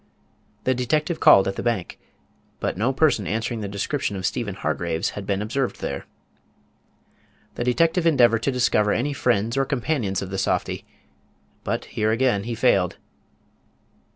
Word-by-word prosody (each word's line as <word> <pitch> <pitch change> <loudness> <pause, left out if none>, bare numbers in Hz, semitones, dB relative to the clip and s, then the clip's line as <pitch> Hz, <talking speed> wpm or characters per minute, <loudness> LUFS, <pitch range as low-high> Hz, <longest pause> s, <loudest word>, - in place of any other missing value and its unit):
The 130 - +2
detective 150 +7 -1
called 95 - +7
at 95 - -3
the - - -2
bank; 115 -7 -2 0.6
but - - -2
no 115 +8 +1
person 135 - +2
answering 115 +1 -2
the 105 - -3
description 100 +3 -2
of 95 -1 -4
Stephen 105 -2 -2
Hargraves 80 -1 -2
had 100 -1 -7
been 100 0 0
observed 125 +4 -2
there. - - -5 1.5
The - - -3
detective 165 +7 +2
endeavored 120 -7 +4
to 140 - 0
discover 110 -4 +2
any 140 +5 -1
friends 120 -2 0
or 135 - +3
companions 125 - -1
of 95 - -7
the 95 - -2
softy; - - -1 0.8
but - - -2
here 110 0 -1
again 115 -4 +1
he 120 0 -3
failed. 100 -7 +2
115 Hz, 155 wpm, -23 LUFS, 100-130 Hz, 1.5 s, called